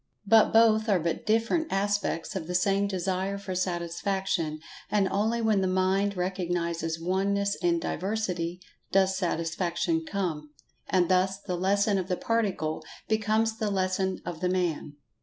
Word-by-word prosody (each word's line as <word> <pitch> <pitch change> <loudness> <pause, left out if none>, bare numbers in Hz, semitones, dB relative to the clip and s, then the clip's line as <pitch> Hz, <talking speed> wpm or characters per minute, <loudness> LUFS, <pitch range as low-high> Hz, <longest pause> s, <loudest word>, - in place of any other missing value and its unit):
But 220 +2 +5
both 225 -1 +4
are 195 -3 +4
but 165 +4 -3
different 230 +9 +1
aspects 200 -3 -1
of 165 -4 -4
the 180 - -3
same 195 +2 +2
Desire 190 +1 -2
for 200 -1 -5
Satisfaction, 175 -2 -1 0.3
and 205 -2 +2
only 220 +4 0
when 215 -3 +3
the 190 - +1
Mind 190 +2 +1
recognizes 170 -3 -2
Oneness 200 +3 0
in 345 -1 +2
Diversity 180 - -2 0.3
does 190 0 +3
Satisfaction 170 -1 -1
come. 160 -5 -3 0.4
And 180 -2 +3
thus 190 +2 +2
the 185 -3 -4
lesson 200 +2 +2
of 185 - -4
the 180 -2 -1
Particle 185 -9 -1 0.2
becomes 220 +1 +1
the 215 - 0
Lesson 190 -1 -1
of 170 -2 -5
the 180 +1 0
Man. 175 -5 -1
190 Hz, 145 wpm, -28 LUFS, 175-205 Hz, 0.4 s, But